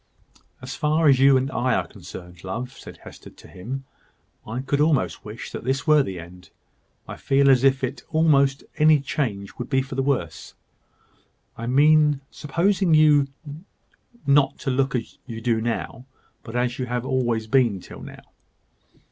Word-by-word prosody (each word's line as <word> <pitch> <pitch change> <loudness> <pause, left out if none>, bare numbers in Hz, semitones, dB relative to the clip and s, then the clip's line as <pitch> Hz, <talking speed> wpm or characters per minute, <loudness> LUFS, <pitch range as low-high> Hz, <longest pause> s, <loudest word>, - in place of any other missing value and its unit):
"As 130 - -6
far 155 +1 +1
as 135 -3 +5
you 135 0 +6
and 130 +1 -1
I 125 0 0
are - - 0
concerned, 90 0 -12
love," 120 +7 -5
said - - -12
Hester - - -12
to - - -17
him, 125 +9 -7 0.6
"I 120 +4 -4
could 140 +2 -1
almost 150 -3 +1
wish 110 +2 -8
that - - -7
this 135 +2 -1
were 150 -1 +5
the 95 -9 -5
end. 90 0 -13 0.6
I - - -8
feel 140 0 +3
as 130 -1 +3
if 135 -1 +3 0.3
almost 140 -4 +2
any 155 0 +5
change 110 -8 -3
would 125 - -5
be 135 -2 +1
for 135 +1 -9
the 135 - -1
worse; 130 - -3 1.0
I 115 - -6
mean 150 +2 +4
supposing 175 +3 +1
you 150 -2 +5 1.0
not 140 -1 +3
to 135 - -1
look 135 +1 0
as 115 -3 -5
you 115 -1 -6
do 115 -1 0
now, 120 +2 -4 0.4
but 115 0 -10
as 125 +1 -1
you 125 - -2
have 125 0 -3
always 120 -4 0
been 115 -4 +2
till - - -12
now. - - -11
130 Hz, 165 wpm, -23 LUFS, 115-145 Hz, 1.0 s, you